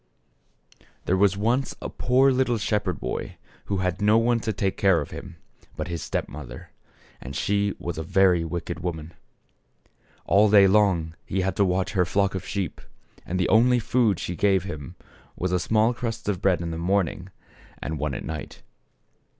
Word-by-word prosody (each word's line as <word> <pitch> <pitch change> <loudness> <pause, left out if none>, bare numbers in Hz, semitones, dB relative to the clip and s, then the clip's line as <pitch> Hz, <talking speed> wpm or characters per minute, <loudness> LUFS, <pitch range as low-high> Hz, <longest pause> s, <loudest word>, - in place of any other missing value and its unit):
AM' - - -27 0.2
There 95 - +2
was 95 0 +3
once 120 +6 0
a - - -5
poor 130 +2 +3
little 125 -2 +1
shepherd 105 0 -1
boy - - -4 0.3
who 100 - -2
had 90 +1 -2
no 105 +2 +5
one 115 +1 +2
to 110 - -2
take 100 -2 -1
care 95 -4 +3
of 75 - -6
him 90 -2 -8 0.4
but - - -4
his 85 -1 -4
step - - -3
mother, 70 -5 -10 0.5
and 65 +2 -8
she 100 +4 0
was 85 -2 -5
a - - -3
very 90 0 +3
wicked 85 +1 -4
woman. 85 -2 -5 1.1
All 105 +2 +4
day 100 -1 +7
long 95 -5 +3
he 95 - -2
had 95 +1 -1
to 100 - +4
watch 90 0 0
her 95 -3 +2
flock 100 +2 +1
of 95 - -5
sheep, 100 -6 -3 0.5
and 90 +2 -2
the 90 - +1
only 125 +3 +5
food 115 -4 +1
she. 90 - -4
gave 95 -1 +2
him 75 -8 -7 0.4
was 90 0 -2
a 90 - +2
small 110 +6 +2
crust 115 -2 -5
of 100 -3 -1
bread 95 -3 +2
in 85 -1 -3
the 80 - -4
morning 90 0 -1 0.5
and 80 -1 -4
one 75 -3 -2
at - - -6
night. 75 -2 -7
95 Hz, 185 wpm, -25 LUFS, 85-105 Hz, 1.1 s, day